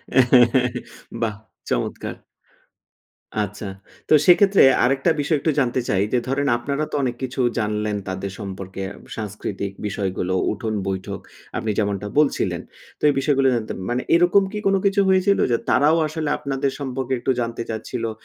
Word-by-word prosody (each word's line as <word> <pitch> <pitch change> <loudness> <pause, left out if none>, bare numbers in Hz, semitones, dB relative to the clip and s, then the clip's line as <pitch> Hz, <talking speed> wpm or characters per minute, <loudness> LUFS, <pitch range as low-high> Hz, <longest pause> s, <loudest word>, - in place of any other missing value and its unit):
হ্যাঁ, 125 -1 +5 0.5
বাহ! 110 -2 0 0.3
চমৎকার। - - -2 1.3
আচ্ছা। 105 +1 -5 0.4
তো - - +5
সেক্ষেত্রে 195 +2 +6 0.2
আরেকটা 135 +6 +2
বিষয় 150 +1 +1
একটু 160 - +1
জানতে 130 -1 +1
চাই 95 -1 +2
যে, - - +4
ধরেন 140 +2 0
আপনারা 140 +5 -2
তো - - -2
অনেক 125 -2 -1
কিছু 130 +1 -4 0.2
জানলেন 105 -1 -1
তাদের 95 +1 -4
সম্পর্কে। 95 -1 -6 0.4
সাংস্কৃতিক 100 -2 -4 0.2
বিষয়গুলো, 95 -2 -2 0.2
উঠোন 110 +1 -3
বৈঠক, 95 -1 -3 0.4
আপনি 110 - -1
যেমনটা 100 -1 -1
বলছিলেন। 150 - +1 0.4
তো - - -23
এই - - +3
বিষয়গুলো 135 -1 +2
জানতেন, 110 -2 -3
মানে 125 +1 0
এরকম 175 +3 +5
কি 210 - -4
কোনো 195 0 +4
কিছু 200 +1 +3
হয়েছিল 190 +1 +3
যে, 115 - +3
তারাও 155 +3 +4
আসলে 155 -1 -3
আপনাদের 140 -1 -2
সম্পর্কে 130 -1 -3
একটু 130 - 0
জানতে 115 0 -3
চাচ্ছিলো? 115 +1 -3
125 Hz, 150 wpm, -22 LUFS, 105-145 Hz, 1.3 s, সেক্ষেত্রে